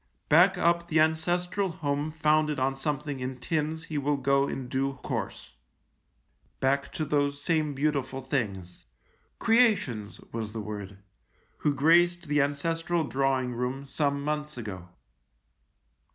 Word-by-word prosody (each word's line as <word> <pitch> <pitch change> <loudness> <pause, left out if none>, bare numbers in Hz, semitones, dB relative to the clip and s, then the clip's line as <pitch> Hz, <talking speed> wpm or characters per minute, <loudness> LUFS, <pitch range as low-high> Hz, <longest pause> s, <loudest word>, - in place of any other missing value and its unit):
Back 180 +5 +6
up 170 -1 +2
the 160 -2 +2
ancestral 175 +5 +1
home 150 -3 -2
founded 155 -1 +2
on 135 0 0
some 145 +2 -1
56 150 - -16
THE 145 - -2
LIEUTENANT 130 -1 -6
thing 160 - +1
in 150 - 0
tins 160 0 -6
he 160 -2 -5
will 145 +1 +1
go 140 +1 +2
in 130 -2 -4
due 135 +2 -1
course; - - -5 1.0
back 140 +1 +1
to 155 - -2
those 145 -1 0
same 155 -2 0
beautiful 140 -2 -1
things 100 - -4 0.2
— - - -40
creations 205 - +2
was 110 -2 -4
the 115 - -4
word 100 -2 -6 0.3
— - - -38
who 145 -1 +1
graced 175 +4 +4
the 150 -2 +2
ancestral 165 +4 0
drawing 135 -3 0
room 125 +3 -3
some 140 0 -1
months 150 -1 -3
ago. 95 -6 -7
145 Hz, 150 wpm, -28 LUFS, 130-160 Hz, 1.0 s, Back